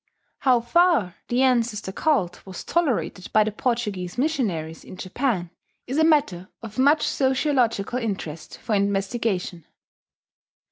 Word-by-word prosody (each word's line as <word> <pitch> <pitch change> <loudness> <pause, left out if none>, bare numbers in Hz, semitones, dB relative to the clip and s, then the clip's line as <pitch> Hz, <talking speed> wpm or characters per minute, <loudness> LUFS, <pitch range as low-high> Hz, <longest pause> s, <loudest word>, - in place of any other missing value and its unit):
How 250 -3 +3
far 270 - +3
the 245 +2 +2
ancestor 235 -6 +1
cult 205 - 0
was 190 -2 -8
tolerated 265 - -1
by 215 - +6
the 215 - -2
Portuguese 210 -6 -2
missionaries 205 - -1
in 185 - -11
Japan 185 -3 -2 0.3
is 265 +5 -2
a - - +5
matter 285 - +2
of 220 +1 -7
much 290 +4 +4
sociological 255 -5 +1
interest 175 -9 -5
for 225 - -3
investigation. 195 -3 -1
225 Hz, 125 wpm, -24 LUFS, 190-265 Hz, 0.3 s, by